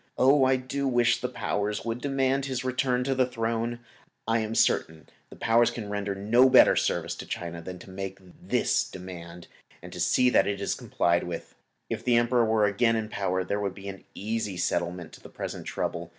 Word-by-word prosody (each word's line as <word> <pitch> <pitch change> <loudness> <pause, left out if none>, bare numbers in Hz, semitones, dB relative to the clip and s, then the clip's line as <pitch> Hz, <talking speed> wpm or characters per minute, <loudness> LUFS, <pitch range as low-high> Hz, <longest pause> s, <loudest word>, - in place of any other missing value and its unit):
Oh! 135 +1 +5
I 130 0 +4
do 135 +2 -2
wish 120 -1 +2
that 125 - -1
the - - -12
Powers 105 -2 -2
would 115 +1 -3
demand 135 -1 0
his 130 -2 -3
return 130 0 0
to 135 +1 0
the 130 -1 +2
throne! 115 0 -2 0.5
I 115 0 +2
am 110 0 -3
certain 80 -7 +2
that - - -26 0.2
the - - -12
Powers 115 +1 +3
can 105 -4 -6
render 100 -1 -2
no 120 +6 +4
better - - +7
service - - 0
to - - -8
China 85 -1 -5
than 90 +2 -7
to 95 - -13
make 95 0 -5 0.2
this - - +1
demand 90 -2 -9 0.3
and - - -11
see 125 - +3
to 125 - +6
it - - -4
that - - +4
it 100 -1 -2
is 100 - -1
complied 85 0 0
with. 85 -1 -6 0.3
If 115 0 -4
the 120 -1 +3
Emperor 120 0 +3
were 110 -1 +3
again 115 +3 +2
in 110 -1 -2
power 95 -3 -1
there 100 +2 -2
would 100 -2 -3
be 100 0 -8
an 95 0 -9
easy 105 -2 -3
settlement 85 0 -2
of - - -22
the - - -12
present - - -6
trouble. - - -3
110 Hz, 215 wpm, -27 LUFS, 95-125 Hz, 0.5 s, better